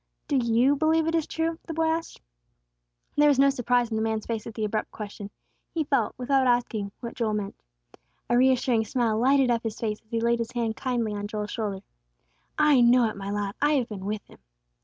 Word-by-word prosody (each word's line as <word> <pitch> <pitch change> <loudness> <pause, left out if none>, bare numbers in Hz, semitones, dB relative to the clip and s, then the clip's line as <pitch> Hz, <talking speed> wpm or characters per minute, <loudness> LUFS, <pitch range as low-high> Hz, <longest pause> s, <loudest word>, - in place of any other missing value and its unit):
"Do 285 - +1
you 240 +3 +3
believe 315 +2 +2
it 325 - -1
is 325 -2 0
true?" 325 0 -2
the 325 - -6
boy 325 - +1
asked. 325 +1 -2 1.0
There 295 0 +5
was 285 -3 +4
no 275 +1 +5
surprise 245 -2 +1
in - - -1
the - - 0
man's 220 -1 -1
face 225 -2 -4
at 225 - -8
the 220 - -1
abrupt 215 +1 -2
question, 205 -1 -8 0.5
he 320 - +1
felt, 275 -7 0
without 260 +1 +2
asking, 235 -4 0
what 235 -1 -6
Joel 220 -3 -1
meant. 200 -1 -4 0.7
A 240 - +2
reassuring 250 -2 +3
smile 225 -1 0
lighted 265 +1 +4
up 230 -1 +1
his 225 -2 -5
face 215 -2 -3
as 215 - -37
he 230 -1 -1
laid 235 +1 +1
his 230 - -4
hand 230 -2 -1
kindly 240 -5 -2
on 205 0 -4
Joel's 210 0 -4
shoulder. 205 -4 -3 0.8
"I 300 -4 +5
know 240 0 +5
it, - - -7
my 195 0 -6
lad; 205 -1 -2
I 295 +1 +3
have 260 -5 0
been 195 -3 -7
with 210 0 -3
Him." - - -18
235 Hz, 220 wpm, -26 LUFS, 215-270 Hz, 1.0 s, There